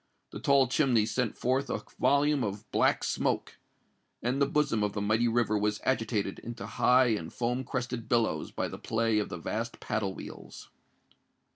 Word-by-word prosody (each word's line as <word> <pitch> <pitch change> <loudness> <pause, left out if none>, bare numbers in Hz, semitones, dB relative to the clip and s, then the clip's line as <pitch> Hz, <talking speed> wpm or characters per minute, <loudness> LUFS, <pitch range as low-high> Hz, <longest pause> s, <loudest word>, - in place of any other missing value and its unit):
The - - -7
tall 140 -2 +4
chimney 125 -5 +3
sent 125 0 -1
forth 130 +3 0
a - - -3 0.2
volume 145 -1 +3
of 105 +1 -4
black - - +2
smoke; - - -1 0.6
and 125 +4 0
the 140 - +4
bosom 140 -7 +1
of 105 -1 0
the 105 - -2
mighty 110 +3 +2
river 115 -2 +1
was 105 0 0
agitated 110 -6 -1
into 120 0 -7
high 125 0 +4
and 100 -8 -2
foam 125 +2 -1
crested 125 -2 -4
billows 115 -2 +1
by - - -3
the - - -8
play 115 -1 +1
of 105 - -2
the - - -5
vast 115 +7 -4
paddle 105 -3 -2
wheels. - - -10
115 Hz, 170 wpm, -29 LUFS, 105-130 Hz, 0.6 s, tall